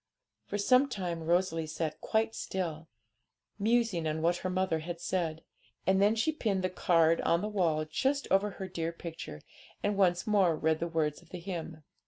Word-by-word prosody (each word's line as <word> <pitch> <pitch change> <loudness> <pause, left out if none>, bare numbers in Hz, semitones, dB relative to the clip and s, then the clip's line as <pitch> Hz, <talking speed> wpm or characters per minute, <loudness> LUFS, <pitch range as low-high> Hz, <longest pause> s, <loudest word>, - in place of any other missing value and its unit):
For 205 - -2
some 255 +7 +4
time 180 -8 -3
Rosalie 170 -1 +1
sat 155 0 -3
quite 220 0 +1
still, 165 -6 -4 0.7
musing 215 -6 +2
on 155 +1 -2
what 175 +1 +3
her 185 - -3
mother 185 -3 0
had 170 +2 -6
said, 170 -3 -2 0.4
and 190 +1 +3
then 210 +2 +4
she 225 +8 +1
pinned 210 -11 -1
the 185 - 0
card 165 -2 +3
on 170 +1 +2
the 210 - -2
wall 170 -7 +1
just 270 - 0
over 195 +2 +4
her 190 -1 -6
dear 165 -2 -3
picture, 165 - -8 0.4
and 205 0 +1
once 180 -3 +2
more 195 -6 +3
read 160 0 +1
the 170 - -1
words 155 -3 -1
of - - -21
the 180 - -7
hymn. 165 -3 -6
175 Hz, 185 wpm, -31 LUFS, 165-200 Hz, 0.7 s, some